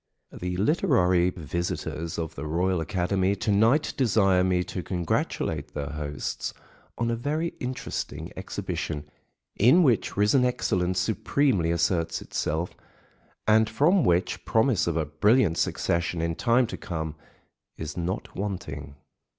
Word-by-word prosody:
The 90 0 -4
literary 95 - +3
visitors 85 -1 -4
of 80 -1 -3
the 75 - -6
Royal 90 +2 +1
Academy 95 +3 0
to 105 - -1
night 115 +9 +3
desire 100 -7 +3
me 90 -1 +2
to 90 0 -5
congratulate 90 -3 -2
their 70 -1 -3
hosts 75 -2 -4 0.4
on 115 0 0
a - - +1
very 150 +7 -1
interesting 125 0 -4
exhibition, 75 -2 -4 0.5
in 130 - +6
which 120 - +1
risen 105 +6 +4
excellence 95 -7 0
supremely 110 - +1
asserts 85 0 +1
itself, 80 +3 -2 0.7
and 110 0 +4
from 155 - +3
which 90 +1 +1
promise 110 -4 +2
of 85 -1 0
a 80 - +1
brilliant 85 - +3
succession 85 0 0
in 85 0 0
time 120 +8 +3
to 115 - -6
come 80 -3 -4 0.6
is 80 -1 -5
not 90 +4 -4
wanting. 75 -8 -5
90 Hz, 130 wpm, -26 LUFS, 85-115 Hz, 0.7 s, in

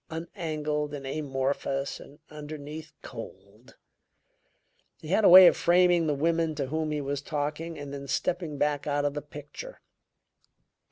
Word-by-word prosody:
Unangled 155 -3 -3
and 140 -1 -8
amorphous, 135 -1 -2
and 145 - -14
underneath, 150 +1 -8
cold! 115 -1 -11 1.2
He 155 - -11
had 205 +5 +2
a - - +7
way 185 +1 +11
of - - +7
framing 175 -1 +3
the 150 - +1
woman 165 +1 0
to 140 -2 -2
whom 155 +3 -2
he 150 -1 -2
was 140 0 -3
talking 150 +3 -4
and 145 -1 -7
then 140 -1 -7
stepping 165 +1 -2
back 145 0 0
out 145 0 0
of 145 - 0
the 150 - -4
picture. 150 - -10
150 Hz, 150 wpm, -28 LUFS, 140-160 Hz, 1.2 s, way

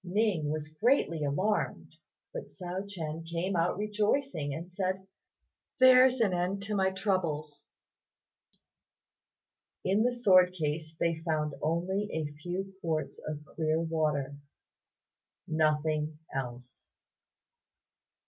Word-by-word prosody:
Ning 185 -5 +1
was 155 0 -2
greatly 165 - +1
alarmed, 185 +10 -1 0.4
but - - -5
Hsiao 185 +2 -5
ch'ien 165 -4 -5
came 170 +3 -2
out 170 +1 +1
rejoicing, 210 - 0
and 165 +5 -6
said, 190 0 -2 0.7
"There's 255 0 +7
an 210 -5 +3
end 180 +3 -1
of 210 - -1
my 190 -1 +3
troubles." 165 -7 -1 2.2
In 195 +3 +3
the 245 +2 +3
sword 185 -7 +5
case 155 -1 -3
they 165 -1 0
found 155 -3 -1
only 180 +6 0
a 155 -2 -2
few 190 +3 -4
quarts 160 -2 -2
of 150 0 -5
clear 155 0 0
water; 155 -4 -1 1.1
nothing 155 -1 +1 0.2
else. 125 -2 -6
170 Hz, 110 wpm, -30 LUFS, 155-195 Hz, 2.2 s, There's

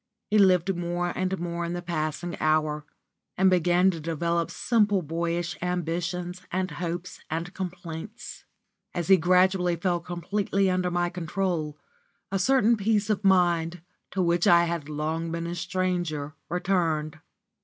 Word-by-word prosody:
He 215 - +5
lived 190 -1 +4
more 175 0 -2
and 185 +1 -1
more 170 0 -3
in 170 0 -3
the 175 - -3
passing 170 +1 -3
hour, 155 -1 +1 0.5
and 190 0 +5
began 180 +1 +4
to 165 - -6
develop 170 +1 -1
simple 205 -5 +2
boyish 170 +3 -2
ambitions 180 +1 -2
and 185 0 -1
hopes 175 +3 -5
and 165 +3 -3
complaints. 180 +2 -7 0.5
As 175 0 -2
he 190 - +8
gradually 180 +1 +3
fell 175 +1 0
completely 190 +3 -1
under 185 0 +1
my 175 0 0
control, 175 -3 -2 0.5
a 195 - 0
certain 235 +1 +4
peace 210 0 +1
of 210 -1 -1
mind, 175 -3 +2 0.3
to 190 - 0
which 170 0 +2
I 170 0 +7
had 170 -3 -3
long 160 +2 -2
been 170 0 -3
a 170 - -3
stranger, 175 -5 -2 0.2
returned. 165 -4 0
175 Hz, 145 wpm, -27 LUFS, 165-185 Hz, 0.5 s, he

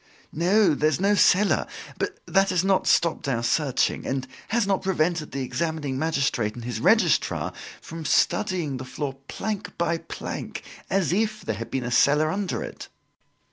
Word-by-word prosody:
"No, 185 +4 +3
there's 155 +3 +1
no 200 +2 +3
cellar. 200 0 +4 0.3
But 405 +1 -2
that 195 0 +3
has 180 -1 +1
not 195 -1 +2
stopped 170 -3 +2
our 120 -4 0
searching, 135 +2 +1
and 130 -1 -2 0.2
has 225 -1 +1
not 195 -1 +1
prevented 170 -4 0
the 135 0 -3
examining 145 0 -2
magistrate 140 -8 0
and 120 -1 -8
his 120 -2 -3
Registrar 190 - +2 0.3
from 165 -1 -8
studying 175 -10 +1
the 130 - -6
floor 135 +1 -5
plank 200 -3 -4
by 170 -1 0
plank, - - -6 0.3
as 185 -5 +1
if 215 +2 0
there 110 - -2
had 115 - -6
been 130 - -2
a 120 - -4
cellar 150 +5 +4
under 195 0 -2
it." - - -8
165 Hz, 165 wpm, -25 LUFS, 135-195 Hz, 0.3 s, cellar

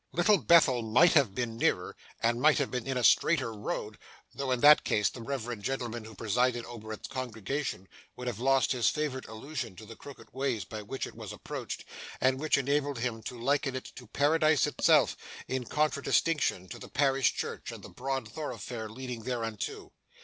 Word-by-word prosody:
Little 190 +3 +4
Bethel 145 -8 +5
might 115 +9 +5
have 135 - +3
been 115 -2 -2
nearer, - - +1 0.3
and 120 +1 +2
might 155 +2 +5
have 140 -3 0
been 125 0 -3
in 135 -1 -1
a 125 - -1
straighter 130 -2 +4
road, 105 0 -5 0.3
though 140 -1 -3
in 125 -1 +1
that 150 +1 +8
case 105 -1 +2
the 120 - -10
reverend 120 -3 -4
gentleman 120 -2 -3
who 110 -1 -11
presided 120 +3 0
over 110 -2 -9
its 110 - -6
congregation 130 -4 -4 0.3
would 125 - -7
have 120 -4 -3
lost 135 +1 +3
his 120 -5 +3
favourite 150 -4 -3
allusion 115 -1 -6
to 110 - -11
the 115 +1 -10
crooked 140 +3 -13
ways 130 -5 -1
by 110 -1 -7
which 130 +6 -4
it - - -10
was - - -8
approached, - - -6 0.3
and 130 0 +2
which 155 0 +2
enabled 140 0 0
him 115 -1 -2
to 125 - -7
liken 140 +2 0
it 130 - -6
to 125 - -11
Paradise 155 +4 +3
itself, - - +3 0.3
in 130 -1 -2
contradistinction 150 - +1
to - - -8
the - - -10
parish 135 -2 +2
church - - -4
and - - -10
the - - -9
broad 135 +1 -3
thoroughfare 120 -6 -6
leading 125 0 -6
thereunto. 115 -3 -4
125 Hz, 185 wpm, -30 LUFS, 115-140 Hz, 0.3 s, that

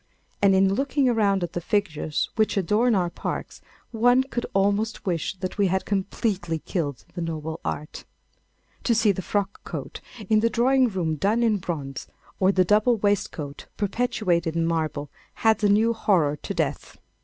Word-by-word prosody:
And, 195 -1 +5
in 190 0 +4
looking 275 +3 +1
around 205 -6 +2
at 175 - -4
the 175 - -3
figures 160 -6 -1
which 215 -2 +1
adorn 210 +6 +2
our 175 -3 0
parks, - - -5 0.3
one 245 +3 +4
could 245 -3 -4
almost 205 +3 +1
wish 175 -1 -1
that 185 +2 -6
we 200 - +4
had 190 +1 0
completely 190 -3 -1
killed 145 -5 -4
the 175 - -5
noble 160 -1 -4
art. 150 - -5 0.8
To 235 - +3
see 220 -2 +4
the 190 - -3
frock 200 +1 -2
coat - - -7 0.3
of 215 0 +4
the 230 - +3
drawing 255 +3 +3
room 170 -6 -2
done 215 +8 +1
in 220 -3 +3
bronze, 145 -7 -5 0.3
or 190 0 +4
the 185 -2 +3
double 215 +5 +3
waistcoat 185 -8 -2
perpetuated 190 -6 0
in 165 -1 +1
marble, 155 -3 -2 0.3
adds 220 -1 +3
a 205 - +4
new 220 +3 +4
horror 180 -10 +2
to - - -6
death. - - -2
195 Hz, 165 wpm, -25 LUFS, 170-220 Hz, 0.8 s, And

